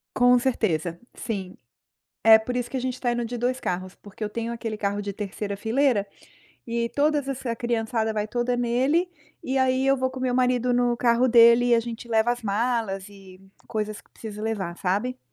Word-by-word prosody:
Com 245 0 +5
certeza, 175 -10 -1 0.2
sim. 195 -5 -5 0.7
É 220 0 +9
por 250 +3 -4
isso 245 - -2
que 270 - -4
a - - -1
gente 255 0 -2
está 245 -1 -1
indo 240 0 -1
de 240 +1 -5
2 255 +2 -1
carros, 185 +1 -3
porque 205 +1 -13
eu - - -2
tenho 230 +2 -4
aquele 225 -2 -4
carro 200 0 -1
de 200 -1 -4
terceira 200 0 -5
fileira 225 -1 +1 0.6
e 235 0 -1
todas 290 -1 +1
essa 255 -3 -3
criançada 225 -2 -1
vai 210 0 -2
toda 240 +2 -1
nele. 260 +9 +1 0.3
E 265 +1 -2
aí 260 0 +2
eu 275 0 +4
vou 260 0 -1
com 260 - -8
o - - -5
meu 250 -1 0
marido 250 -1 +2
no 245 -1 +2
carro 245 +1 +3
dele, 235 +1 +7
e 240 - +5
a 230 - +4
gente 235 0 -7
leva 225 +1 +2
as 245 -1 -7
malas 210 -2 -1
e 195 -2 -15 0.3
coisas 215 -1 -3
que - - -32
precisa 215 -1 -8
levar, 195 -6 -3
sabe. 210 +8 -1
235 Hz, 205 wpm, -25 LUFS, 210-250 Hz, 0.7 s, É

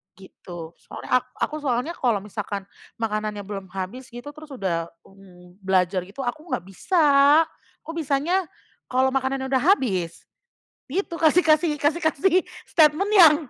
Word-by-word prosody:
Gitu 175 -3 -11
soalnya - - -11
ak - - -27 0.2
aku 305 - -1
soalnya 265 -1 -1
kalo 230 -6 +1
misalkan, 205 0 -5 0.4
makanannya 215 -1 -2
belum 200 -1 -7
habis 230 +7 -6
gitu 245 +4 -8
terus 305 0 -11
udah, 180 -8 -2 0.2
mmm, 180 -2 -18
belajar 185 -2 +1
gitu 205 +8 -8
aku 265 +5 -4
nggak - - 0
bisa, 340 - 0 0.8
aku - - -8
bisanya, 320 +5 0 0.4
kalo 260 +1 +2
makanannya 265 0 -1
udah 265 - +3 0.2
habis, 185 - -2 0.7
gitu 355 +1 -2
kasih 325 +1 +4
kasih 315 -1 +3
kasih 295 +4 +1
kasih 315 +4 +2 0.3
statement 315 +6 +3
yang. 325 -6 +9
255 Hz, 140 wpm, -24 LUFS, 195-305 Hz, 0.8 s, yang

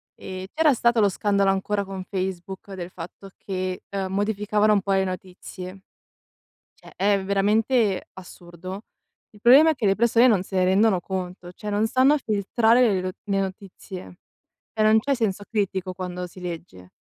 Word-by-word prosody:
ehm, 185 -1 -7
c'era 310 -2 +3
stato 235 -1 +2
lo 205 - +5
scandalo 200 0 +1
ancora 200 +1 -1
con 190 -1 -6
Facebook, 190 +1 -5
del 180 -2 -6
fatto 180 +3 -10
che, 185 -1 -4
ehm, 195 -1 -3
modificavano 210 +1 +1
un 200 - +2
po' 195 0 -1
le 190 0 +3
notizie. 185 0 -7 0.9
Cioè, - - -17
è 200 0 +2
veramente 210 +2 +1
assurdo. 185 +1 -10 0.5
Il 210 - -19
problema 275 +8 +7
è 315 - +1
che 240 -5 -2
le 195 0 +3
persone 235 +2 +4
non 195 -5 +2
se 190 - -11
ne 185 -1 +3
rendono 190 +1 +3
conto, 180 -1 -5
cioè 210 +4 -9
non 210 +2 +1
stanno 260 +5 +4
filtrare 225 0 +2
le 190 - 0
lo 185 0 -3
le 195 -2 0
notizie, 190 - -7 0.5
e 220 - -1
non 220 +1 +5
c'è 275 +5 0
senso 210 -4 -1
critico 195 -4 -1
quando 180 0 -5
si 180 +1 -14
legge. 165 - -8
195 Hz, 170 wpm, -24 LUFS, 185-215 Hz, 0.9 s, problema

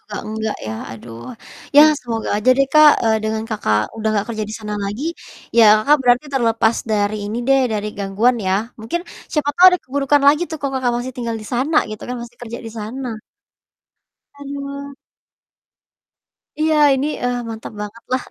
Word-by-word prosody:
gak - - -5
enggak 220 0 -3
ya, 110 - -3 0.2
aduh, 115 +1 -10 0.5
ya 290 - +10 0.2
semoga 230 -2 -4
aja 215 +5 +1
deh, 275 - +4
Kak, 305 -1 +8
eee, 220 -1 +3
dengan 220 0 -2
Kakak 110 - +1 0.2
udah 220 0 -1
gak 200 - -1
kerja 220 - -4
di - - -6
sana 210 -1 -5
lagi, 205 +8 -4 0.5
ya 230 - +8
Kakak 290 +8 +3
berarti 245 +2 +3
terlepas 230 -2 +2 0.2
dari 210 0 +1
ini 225 - -3
deh, 270 0 +4
dari 210 0 -2
gangguan 205 +5 +1
ya, 185 - +1 0.3
mungkin 225 +11 -3 0.3
siapa 295 -2 0
tau 365 - +7
ada 360 - +1
keburukan 280 +2 +1
lagi 300 +3 +5
tuh 315 - -5
kalau 275 -1 -2
Kakak 245 -1 +1
masih 250 +2 -5
tinggal 235 -3 -4
di - - -10
sana, 280 +6 +1
gitu 215 - -8
kan, 250 - -3
masih 240 0 -11
kerja 235 0 -6
di 225 - -7
sana. 230 +1 -5 1.2
Aduh. 280 0 -7 1.6
Iya, 310 0 +2 0.2
ini, 270 +2 0 0.2
eee, 245 0 0
mantap 220 0 -7
banget 210 +3 -8
lah. 255 -1 0
235 Hz, 175 wpm, -19 LUFS, 215-275 Hz, 1.6 s, ya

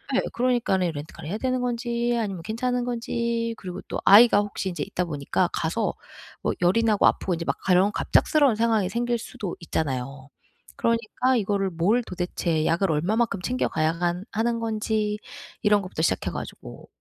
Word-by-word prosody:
예. - - +4
그러니까는 235 -8 +1
렌트카를 150 +1 -8
해야 205 - -2
되는 255 +1 -1
건지 240 -1 -1
아니면 195 -6 -3
괜찮은 245 +2 -1
건지 235 -1 -2
그리고 185 -1 -7
또 - - -2
아이가 210 +1 +8
혹시 205 -1 -2
인제 175 - -3
있다 190 -2 -2
보니까 145 -4 -1
가서 - - -1 0.5
뭐 - - 0
열이 185 +6 +3
나고 215 -3 +4
아프고 185 - +1
인제 165 0 -3
막 - - -1
가려운 185 +2 +4
갑작스러운 285 +1 +3
상황이 220 -3 +2
생길 240 +3 0
수도 205 -4 -6
있잖아요. 135 -4 -3 0.5
그러니까 230 +3 +1
이거를 200 -2 0
뭘 200 +9 +2
도대체 175 -4 -2
약을 170 +2 +2
얼마만큼 200 +6 0
챙겨 250 +6 0
가야 155 0 +1
한 175 +2 -2
하는 230 +2 0
건지 215 -1 -1 0.5
이런 210 -1 +4
것부터 185 -4 -5
시작해 - - 0
가지고 - - -8
210 Hz, 385 characters per minute, -25 LUFS, 175-235 Hz, 0.5 s, 아이가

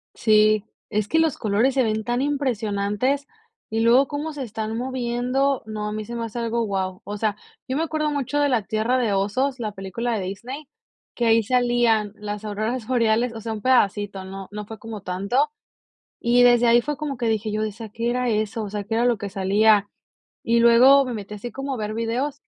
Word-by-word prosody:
Sí, 215 -1 +4 0.2
es 210 -1 -1
que 320 - +2
los 320 -3 +2
colores 220 +5 +1
se 265 -2 +2
ven 220 -1 -1
tan 240 +3 -1
impresionantes 255 -1 -1 0.4
y 225 +1 -1
luego 250 +4 +5
cómo 295 +2 -4
se 280 -2 -5
están 220 -1 -4
moviendo, 255 +2 0
no, 215 -1 -4
a - - -3
mí 215 0 -4
se 235 - -7
me 230 - -3
hace 230 +1 -6
algo, 230 0 -1
guau, 190 -3 -3
o 205 +1 -5
sea, 210 -1 0 0.3
yo 260 - -2
me 320 - +1
acuerdo 305 -1 -1
mucho 290 0 -1
de 290 -1 +3
La 240 -5 +1
Tierra 220 +5 0
de 235 -5 +1
Osos, 245 +7 0
la 215 -3 -3
película 220 +4 -3
de 195 - -3
Disney, 250 +10 -7 0.5
que 240 - 0
ahí 225 -1 +4
salían 240 -3 +2
las 210 0 -6
auroras 215 +3 -3
boreales, 235 -1 +2
o 225 - -7
sea, 225 +1 -4
un 215 - -6
pedacito, 205 -6 +1
no 195 0 -8
no 210 0 -6
fue 220 0 -9
como 220 -2 -7
tanto, 200 +10 0 0.7
y 245 +1 +4
desde 240 -1 +5
ahí 235 +1 +6
fue 295 +3 -3
como 295 -4 -4
que 235 -2 -1
dije 220 -1 0
yo, 215 +1 -1
decía: 215 +1 -5
"¿Qué 230 +3 -2
era 250 +1 0
eso?", 215 0 -1
o 205 - -5
sea, 205 0 -4
qué 225 +2 -3
era 235 +1 +2
lo 240 -2 +3
que 205 0 -5
salía, 205 +2 +3 0.6
y 235 0 +2
luego 255 +4 +7
me 255 - -4
metí 210 -1 -7
así 225 +3 -7
como 270 +2 -4
a - - -4
ver 215 -1 -4
videos 250 +6 -2
230 Hz, 215 wpm, -23 LUFS, 210-250 Hz, 0.7 s, luego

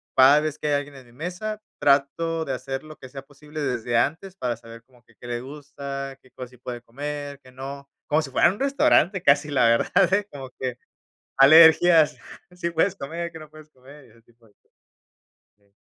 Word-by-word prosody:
cada 135 +3 +7
vez 155 0 -3
que 150 - -4
hay 145 - +1
alguien 145 0 -4
en 130 -2 -13
mi 120 - -20
mesa, 185 - -5 0.2
trato 160 +4 +1
de 135 - -3
hacer 135 +2 -5
lo 155 0 -12
que 130 - -12
sea 135 0 -9
posible 150 +2 -11
desde 120 -3 -1
antes 160 +10 -1
para 125 -2 -2
saber 115 0 -14
como 125 -1 -26
que 115 -1 -27
qué 120 - -11
le 120 0 -4
gusta, 140 -1 -8
qué 130 - -24
cosas 125 -1 -10
sí 125 - -18
puede 120 -1 -7
comer, 145 +3 -7
qué 130 - -17
no, 140 +2 -9 0.2
como 150 +2 +2
si 145 - -7
fuera - - +4
un 205 - -12
restaurante 275 - +2
casi, 145 -1 +3
la 125 -4 +3
verdad, 180 +11 +2
¿eh?, 205 0 +1
como 135 -2 -9
que 125 -2 -4 0.6
alergias: 160 +3 +7 0.4
"Sí 180 -1 -4
puedes 170 +4 +1
comer, 170 +2 -6
qué 160 - -10
no 155 -1 -13
puedes 155 0 -16
comer", 135 +1 -17
y - - -22
ese 115 +1 -23
tipo 115 0 -27
de 105 - -26
cosas. - - -43 1.1
Okey. 100 -1 -36
140 Hz, 210 wpm, -24 LUFS, 130-160 Hz, 1.1 s, cada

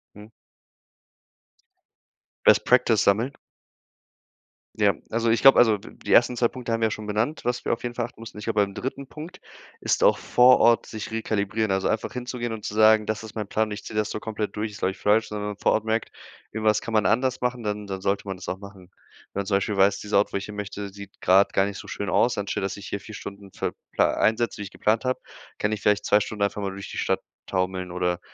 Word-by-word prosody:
Mhm. 105 +1 -12 2.2
Best - - +6
Practice - - +4
sammeln. 115 +8 +2 1.4
Ja, 105 -2 +4 0.2
also, 115 +1 0
ich 115 - +2
glaube 135 0 +8
also, 110 -3 +5
d 100 - -13
die - - -7
ersten 120 +1 +5
2 120 -1 +2
Punkte 125 -2 -6
haben 115 - -1
wir 110 - +4
ja - - -4
schon 105 0 -6
benannt, 110 +9 -1
was 125 0 -1
wir - - -1
auf 115 - -2
jeden 120 -1 -4
Fall 120 - -1
achten 120 - -14
mussten. 115 -2 -10
Ich - - -8
glaube, 105 - +1
beim 100 -1 -1
3. 135 +5 -5
Punkt 160 +6 -10 0.4
ist - - 0
auch - - +5
vor 125 +1 +5
Ort 115 -1 +4
sich 110 -1 -7
rekalibrieren. 110 -1 -1
Also, 95 0 +1
einfach 110 - -1
hinzugehen 125 -1 -4
und 110 -2 -6
zu - - -4
sagen: 110 0 +5
„Das 110 0 -3
ist 110 0 -10
mein 105 -2 -3
Plan 110 +1 0
und - - -9
ich 105 - -6
ziehe - - -8
das 105 0 +1
so - - -4
komplett 105 -1 -4
durch“, 105 0 -3
ist, 105 - -11
glaube 95 - +1
ich, - - -12
falsch, 105 +2 +2
sondern 105 -1 -4
vor - - +2
Ort 110 - 0
merkt, 110 0 -1 0.4
irgendwas 110 -1 +1
kann 115 - -6
man 110 -1 +3
anders 130 +2 +2
machen, 125 -1 -2
dann 105 -1 -3
dann 95 -1 -5
sollte 100 +1 -1
man 95 - -3
das 90 - -8
auch 95 - -3
machen. 100 -2 -13 0.4
Wenn 100 - -2
man - - -6
zum 100 0 +1
Beispiel 100 +1 -2
weiß, 100 +1 +4
dieser 105 -1 0
Ort, 100 - +2
wo - - +1
ich 100 - -5
hin 105 - -9
möchte, 105 0 -5
sieht 100 0 -12
grade 95 +2 +5
gar 95 - +3
nicht 100 0 -5
so - - -10
schön 100 - -4
aus. 120 - +2
Anstatt, 100 -1 -2
dass 95 - -2
ich 100 -1 -9
hier 100 - -3
4 105 +2 -10
Stunden 100 -1 -9
für - - -3 0.2
äh, - - +5
einsetze, 115 +2 +1
die 105 - -5
ich 100 - -9
geplant 110 +4 0
habe, 130 0 -1 0.4
kann 105 - 0
ich 105 -1 -3
vielleicht 105 0 +2
2 105 - +5
Stunden 105 0 -3
einfach 100 +1 -1
mal 100 -1 -2
durch 100 +1 -8
die - - -7
Stadt - - 0 0.2
taumeln 95 -1 -2
oder, 90 -1 -1
105 Hz, 250 wpm, -25 LUFS, 100-115 Hz, 2.2 s, glaube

